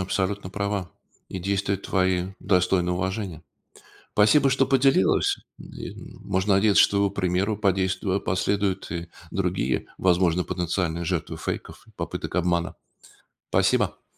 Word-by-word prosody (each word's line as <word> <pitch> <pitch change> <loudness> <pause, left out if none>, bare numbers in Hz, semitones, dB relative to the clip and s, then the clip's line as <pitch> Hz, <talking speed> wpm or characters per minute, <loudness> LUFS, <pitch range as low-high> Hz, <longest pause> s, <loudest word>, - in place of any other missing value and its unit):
абсолютно 95 +1 -2
права, 100 -2 -2 0.4
и 95 - -5
действия 100 +2 0
твои 95 -2 0
достойны 90 -1 +2
уважения. 95 -2 -3 0.7
Спасибо, 135 +7 +5
что 135 +1 +3
поделилась. 135 -7 +3 0.2
И - - -8
н - - -12
можно 95 +1 +1
надеяться, 100 +1 +5
что 100 - +2
его 100 0 +3
примеру 95 +3 0
подейству 95 -1 0
а, 100 - +1
последуют 95 +1 -1
и 85 0 -4 0.2
другие, 65 +1 -1
возможно, 90 -1 +2
потенциальные 85 -1 -2
жертвы 90 -2 -2
фейков - - -6
и - - -18
попыток - - -5
обмана. 90 0 0 0.7
Спасибо. - - +1
95 Hz, 125 wpm, -25 LUFS, 90-100 Hz, 0.7 s, Спасибо